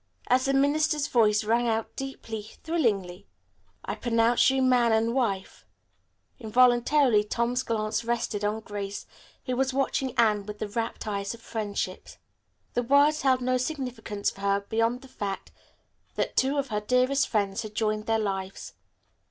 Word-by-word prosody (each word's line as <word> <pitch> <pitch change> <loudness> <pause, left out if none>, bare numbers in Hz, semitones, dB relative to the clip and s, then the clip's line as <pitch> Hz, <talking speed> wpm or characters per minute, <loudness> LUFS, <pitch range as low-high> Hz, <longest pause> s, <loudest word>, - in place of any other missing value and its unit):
As 255 +1 +3
the 275 - +1
minister's 300 +2 +2
voice 215 -6 +3
rang 235 +3 +1
out 225 -1 -1
deeply, 250 -5 -6 0.2
thrillingly, 205 - -1 0.6
"I - - -3
pronounce 230 0 +3
you 265 0 +1
man 250 -2 +4
and 225 +1 +2
wife," 205 -7 -2 0.8
involuntarily 245 +1 +4
Tom's 235 +4 -1
glance 220 -2 -1
rested 230 -3 -2
on 210 +2 -1
Grace, 205 -2 -6 0.4
who 255 - -1
was 265 +1 0
watching 270 -1 0
Anne 210 -3 +3
with 210 0 -6
the 215 - -3
rapt 225 +2 -3
eyes 200 +1 -3
of 230 - -17
friendship. 205 -5 -4 0.6
The 245 - +1
words 285 +5 +4
held 260 -2 +3
no 255 0 +1
significance 250 -7 -3
for 195 - -14
her 200 0 +1
beyond 230 +5 -1
the - - -12
fact 200 -6 -5 0.6
that - - -2
two 275 +2 +2
of 275 -2 -1
her 210 -2 -1
dearest 255 +5 +2
friends 200 -3 0
had 215 -1 -8
joined 215 -1 -1
their 225 0 +2
lives. 195 -3 -4
230 Hz, 155 wpm, -27 LUFS, 210-255 Hz, 0.8 s, man